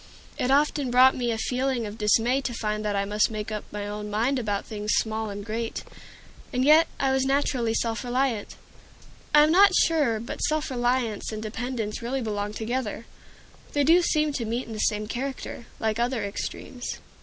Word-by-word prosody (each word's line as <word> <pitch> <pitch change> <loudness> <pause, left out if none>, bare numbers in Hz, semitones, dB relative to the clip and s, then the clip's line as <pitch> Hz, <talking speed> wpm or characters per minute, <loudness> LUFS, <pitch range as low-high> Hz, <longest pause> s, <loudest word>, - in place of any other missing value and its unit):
It 250 - 0
often 285 -1 +2
brought 255 +2 +6
me 245 -1 -1
a 225 - -1
feeling 255 +1 -1
of 210 +1 -7
dismay 230 +5 +3
to 240 -2 -3
find 215 -1 -2
that 210 -1 -1
I 200 0 0
must 210 +1 +2
make 215 0 -5
up 210 -1 -4
my 205 0 -4
own 210 0 -5
mind 235 +6 +1
about 205 -4 -2
things 210 -1 -2
small 220 0 -1
and 200 0 -6
great. 225 +1 -3 0.7
And 255 +1 +1
yet 310 +3 +7
I 270 -1 +2
was 265 0 +2
naturally 265 -4 +1
self 230 +1 -1
reliant. 250 -3 -1 0.8
I 295 - +8
am 305 - +3
not 385 +2 +6
sure 295 -9 +1
but 235 - -6
self 305 -1 0
reliance 240 -4 0
and 215 - -4
dependence 225 0 -4
really 255 +3 -2
belong 210 -2 -2
together. 230 0 -3 0.7
They 290 - +2
do 330 +5 +6
seem 305 -3 +1
to 255 - -2
meet 235 +3 -2
in 225 - -8
the 215 - -6
same 210 0 +1
character, 255 0 -5
like 220 0 -1
other 240 -2 0
extremes. 245 +4 -5
235 Hz, 190 wpm, -26 LUFS, 215-265 Hz, 0.8 s, I